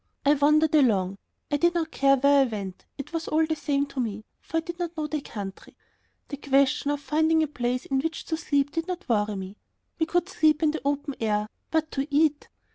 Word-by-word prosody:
I 285 - +6
wandered 300 +2 +3
along. 200 -10 +3 0.3
I 290 - +2
did 345 +4 +2
not 325 -2 -1
care 275 0 +4
where 280 +1 +5
I - - +4
went; 200 -6 -6
it 280 +3 -8
was 330 -1 -3
all 320 +1 +2
the 315 0 -1
same 285 -2 0
to 280 -1 -8
me, 215 -3 -3 0.2
for 325 - -4
I - - +2
did 340 +1 -8
not 345 -1 -4
know 310 - -1
the 300 -1 -3
country. 200 -7 -8 0.5
The 285 - -5
question 280 +1 +2
of 290 0 0
finding 315 +3 +2
a - - 0
place 250 -2 -2
in 270 -1 0
which 325 +3 -3
to 320 - -1
sleep 285 -3 0
did 330 +1 -3
not 365 0 -5
worry 210 -3 +1
me; 190 +1 -7 0.4
we 320 - +1
could 350 +1 +1
sleep 310 -4 +2
in 305 - +4
the 315 - -4
open 285 +1 -1
air.... 210 -1 0 0.2
But 315 -1 0
to 275 +1 -2
eat! 295 0 +1
290 Hz, 225 wpm, -26 LUFS, 260-315 Hz, 0.5 s, I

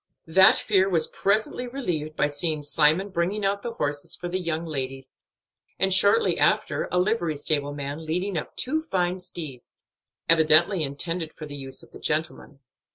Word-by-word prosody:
That 190 +4 +6
fear 195 -2 +2
was 165 -4 +2
presently 220 +5 -1
relieved 175 - -3
by - - +2
seeing 150 +1 -2
Simon 155 +6 +2
bringing 190 +3 -1
out 200 +1 0
the 235 - -5
horses 145 -7 -1
for 175 - -6
the 180 +2 -2
young 165 -2 -2
ladies, 135 -3 -5 0.6
and 190 0 +2
shortly 200 - +3
after - - +1
a 180 - 0
livery 180 -5 0
stable 145 -1 -1
man 145 +2 -5
leading 180 +4 -2
up 160 - -4
two 310 +5 0
fine 185 - -1
steeds, 160 -8 -8 0.5
evidently 165 +3 +5
intended 160 +3 -3
for 155 - -9
the 145 -1 -8
use 135 -1 -7
of - - -18
the - - -12
gentlemen. 150 -2 -3
165 Hz, 165 wpm, -25 LUFS, 150-190 Hz, 0.6 s, That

